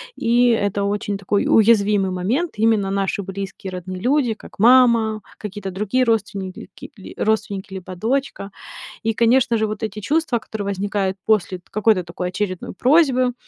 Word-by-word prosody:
И 240 +1 +2
это 205 -3 0
очень 200 0 -2
такой 200 +1 0
уязвимый 205 -3 +4
момент. 235 - -1
Именно 215 -2 +2
наши 195 0 -1
близкие 195 0 -6
родные 185 0 -6
люди, 255 -1 +2
как 215 - -15
мама, 230 -2 +5 0.2
какие-то 205 -2 -6
другие 210 +7 0
родственники, 205 -4 -2 0.5
родственники 205 -3 -1
либо 185 -1 -7
дочка. 225 -2 -2 0.5
И, 225 0 0
конечно 235 +1 +3
же, 220 0 0
вот 215 +1 -6
эти 215 -1 -4
чувства, 295 +2 0
которые 215 -2 -6
возникают 200 -1 -2
после 195 -4 +1
какой-то 215 -4 +2
такой 180 +1 -4
очередной 185 -1 -4
просьбы, 255 - +3
210 Hz, 145 wpm, -21 LUFS, 195-230 Hz, 0.5 s, мама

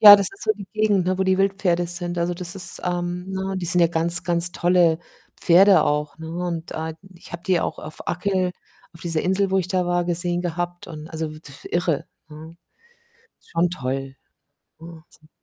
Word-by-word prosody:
Ja, 205 -1 +12
das 200 - +2
ist 395 - -14
so - - +2
die 200 -2 -10
Gegend, 210 -4 +2
ne, 185 0 +1
wo 190 - +1
die 190 0 +2
Wildpferde 195 -3 +1
sind. 175 0 -3
Also, 175 +1 0
das 180 +2 -5
ist 185 -1 -5
ähm, 180 +1 -2
ne, 190 0 -3
die 175 -2 -3
sind 180 0 +3
ja 170 - +6
ganz, 170 +2 0
ganz 170 0 +1
tolle 175 -2 +3 0.4
Pferde 190 +3 +6
auch, 150 +1 -1
ne? 160 0 -7 0.2
Und, 170 -2 -4
ah, 160 0 -3 0.2
ich 170 - -15
habe 170 0 -6
die 180 -3 +2
auch - - -3
auf 155 +1 -9
Achill, 185 +1 0 0.4
auf 165 - -15
dieser 165 -2 -1
Insel, 190 +1 +1
wo 190 - +4
ich 180 -1 -1
da 185 -2 +1
war, 175 0 +1
gesehen 175 0 -1
gehabt 175 +1 -4
und, 155 -1 -8
also, 160 -1 -4
w - - -10
df 140 -3 -13
irre, 170 -4 0 0.2
ne? 160 +2 -11 0.9
Schon 170 +1 0
toll. 135 -4 -4 0.6
Wahnsinn. 160 -1 -14
175 Hz, 200 wpm, -23 LUFS, 165-185 Hz, 0.9 s, Ja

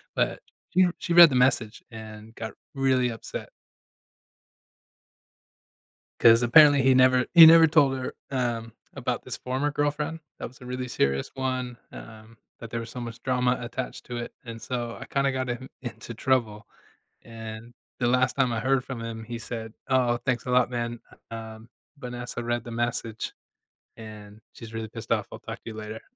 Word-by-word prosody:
but - - 0 0.3
she 185 +1 +4
she 175 - -5
read 170 -1 +11
the 130 - -2
message, 125 -3 +1
and 110 0 -10
got 110 -2 -6 0.2
really 130 -2 +2
upset. 115 - -7 2.7
'Cause 115 +1 +7
apparently, 145 +2 +7
he 135 0 +5
never 130 0 +5
he 165 -2 +11
never 165 0 +9
told 140 -4 +3
her, 130 - -5 0.2
um, 120 -4 -2 0.2
about - - -3
this - - -6
former 130 +3 -2
girlfriend, 150 +2 -1 0.2
that - - -4
was 125 +1 -18
a - - -10
really 125 0 -4
serious 70 - 0
one, 130 -2 -3
um, 110 0 -12 0.2
that 115 - -8
there 115 - -3
was 115 0 -7
so 125 - -7
much 115 0 -7
drama 125 -1 +1
attached 125 +1 -6
to 120 -1 -6
it, 120 - -5
and 115 -1 -8
so, 120 -2 -4
I - - -6
kinda 140 -1 +1
got 130 -1 -3
him 130 +2 -4
into 120 -1 -7
trouble, 115 -3 0 0.6
and 115 +1 -9 0.2
the 120 - 0
last 125 +1 +3
time 135 -3 +2
I 110 - -1
heard 135 0 +2
from 125 -4 -6
him, 115 -1 -6
he 120 +1 -6
said, 110 -1 -7
"Oh, 125 -2 +2
thanks 125 -1 -2
a - - -2
lot, 125 0 +3
man. 120 -1 -3 0.3
Um, 110 0 -8 0.3
Vanessa 125 -2 -6
read 120 -1 -2
the 120 - -8
message, 115 -1 -3 0.6
and 105 -1 -11
she's 115 -1 -11
really 110 -1 -4
pissed 115 0 -9
off. 110 -3 +1
I'll - - -8
talk 115 0 -7
to - - -7
you - - -10
later." 110 +1 -7
120 Hz, 175 wpm, -26 LUFS, 115-130 Hz, 2.7 s, read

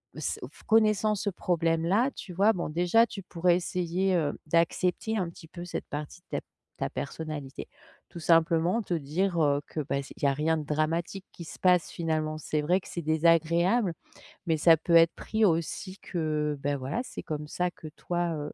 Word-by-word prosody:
s - - -3
f - - -19
connaissant 215 -1 +3
ce 205 +1 -1
problème 165 -3 0
là, 225 +10 +2
tu 185 - -8
vois 200 +5 +4
bon 175 -6 -3
déjà 175 +8 +4
tu 200 -4 -8
pourrais 175 0 +2
essayer, 180 +1 0
heu, 150 -4 0
d'accepter 180 +6 +1
un 180 -4 -1
petit 165 -1 -13
peu 175 +1 -8
cette 175 - -5
partie 150 +4 -6
de - - -55
ta - - -2
p - - -45 0.3
ta - - -2
personnalité, 145 -2 -6 0.4
tout 170 - -9
simplement. 165 +5 +3
Te 180 -5 -2
dire, 170 +5 -1
heu, 145 -2 +3
que 155 - -3
bah 140 -1 -2
s 140 - -8
il - - -13
y - - +4
a 140 - +3
rien 155 +3 +1
de 155 - -3
dramatique 160 +5 -1
qui 170 - -10
se - - -10
passe, 180 -2 +3
finalement. 155 -2 -2
C'est 155 0 -1
vrai 180 +5 +2
que - - -14
c'est 170 - -5
désagréable 170 +6 +3 0.5
mais 165 -2 +1
ça 165 +1 +6
peut 165 +2 -2
être 165 0 +7
pris 220 0 0
aussi 180 +2 -1
que, 155 -3 -1
bah, 145 +1 0
voilà 135 - -3
c'est - - -8
comme 150 -1 -4
ça 180 +3 -1
que 160 - -11
toi, 175 -1 -2
heu 150 -1 -5
170 Hz, 205 wpm, -28 LUFS, 155-180 Hz, 0.5 s, être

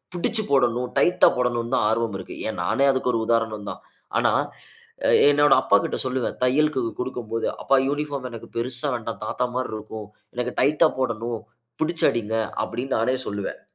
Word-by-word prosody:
புடிச்சு 215 +6 +2
போடணும், 125 -2 +2
டைட்‌டா 180 - +5
போடணும்ன்னு 120 -1 -1
தான் - - +2
ஆர்வம் 110 -2 0
இருக்கு. 95 - -8
ஏன் 110 - -4
நானே 130 +9 +2
அதுக்கு 130 -1 0
ஒரு 115 - +1
உதாரணம் 110 -3 0
தான். - - -10 0.4
ஆனா, - - +3 0.8
அ - - +3 0.2
என்னோட 145 0 +4
அப்பாகிட்ட 100 - +2
சொல்லுவேன் 130 -1 -2
தையலுக்கு 150 +2 +2 0.2
குடுக்கும்போது, 120 -3 -3 0.2
"அப்பா 135 - +3
யூனிபார்ம் 145 -2 -3
எனக்கு 115 -2 -9
பெருசா 120 +3 0
வேண்டாம், 115 -1 -5
தாத்தா 125 - -1
மாரி 130 0 -2
இருக்கும். 110 0 -8 0.3
எனக்கு 125 0 -2
டைட்டா 150 +4 +4
போடணும். 115 -2 -2 0.4
புடிச்சு 160 0 +1
அடிங்க." 110 -2 -3 0.3
அப்படீன்னு 125 +4 -3
நானே 125 +4 +1
சொல்லுவன். 100 -1 -4
125 Hz, 155 wpm, -24 LUFS, 115-135 Hz, 0.8 s, டைட்‌டா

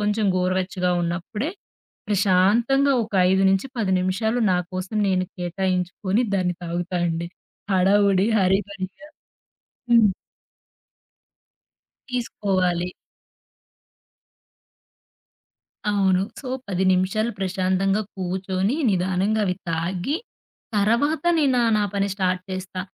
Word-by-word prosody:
కొంచెం 210 0 +1
గోరువెచ్చగా 185 0 0
ఉన్నప్పుడే 185 - -3 0.6
ప్రశాంతంగా 210 +8 +3
ఒక 215 - -11 0.2
5-10 195 +3 +1
నిమిషాలు 215 +6 0
నాకోసం 185 +3 -3
నేను 185 -1 +1
కేటాయించుకొని 185 +3 -1
దాన్ని 180 -2 0
తాగుతా 175 +2 -3
అండి. 170 +1 -2 0.4
హడావుడి 195 +1 +4
హరీబరీగా 195 +6 -1 0.8
హ్మ్. 220 -5 +5 2.0
తీసుకోవాలి. 185 -7 -1 3.0
అవును. 195 -2 +2 0.2
సో, 275 - -8 0.2
10 190 -1 -1
నిమిషాలు 205 +5 0
ప్రశాంతంగా 190 +1 0
కూర్చొని, 190 +4 -1
నిదానంగా 190 +3 +1
అవి 180 -1 0
తాగి, 175 - -1 0.6
తరవాత 235 +11 +2
నేనా, 265 -5 +3 0.2
నా 210 - +2
పని 200 0 +1
స్టార్ట్ 185 -2 0
చేస్తా. 185 0 -5
190 Hz, 85 wpm, -23 LUFS, 185-210 Hz, 3.0 s, హ్మ్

